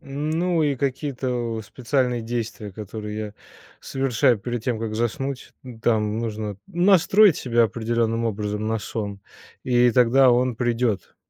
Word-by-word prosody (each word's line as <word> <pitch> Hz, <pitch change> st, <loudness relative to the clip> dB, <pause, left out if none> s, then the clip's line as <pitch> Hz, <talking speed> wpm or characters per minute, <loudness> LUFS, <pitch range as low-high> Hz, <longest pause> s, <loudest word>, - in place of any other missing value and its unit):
ну 155 Hz, +5 st, -1 dB
и 145 Hz, -2 st, +1 dB
какие-то 135 Hz, 0 st, -2 dB, 0.3 s
у 110 Hz, -, -3 dB
специальные 125 Hz, +3 st, -1 dB
действия, 115 Hz, -2 st, -4 dB
которые 105 Hz, +1 st, -6 dB
я 105 Hz, -1 st, -5 dB, 0.5 s
совершаю 130 Hz, -3 st, +1 dB
перед 120 Hz, +2 st, -4 dB
тем, 120 Hz, -3 st, -1 dB
как 110 Hz, -1 st, -4 dB
заснуть, 125 Hz, +4 st, -3 dB
м, 120 Hz, -3 st, -10 dB
там 110 Hz, -1 st, +1 dB
нужно, 110 Hz, -3 st, -4 dB
ну, 175 Hz, +1 st, -1 dB
настроить 195 Hz, 0 st, +6 dB
себя 120 Hz, -2 st, +2 dB
определённым 115 Hz, +1 st, -1 dB
образом 105 Hz, 0 st, -2 dB
на 115 Hz, -, 0 dB
сон, 105 Hz, -1 st, -5 dB, 0.5 s
и 125 Hz, -1 st, +4 dB
тогда 125 Hz, +2 st, +5 dB
он 125 Hz, 0 st, +2 dB
придет. 115 Hz, -4 st, -1 dB
120 Hz, 145 wpm, -23 LUFS, 110-130 Hz, 0.5 s, настроить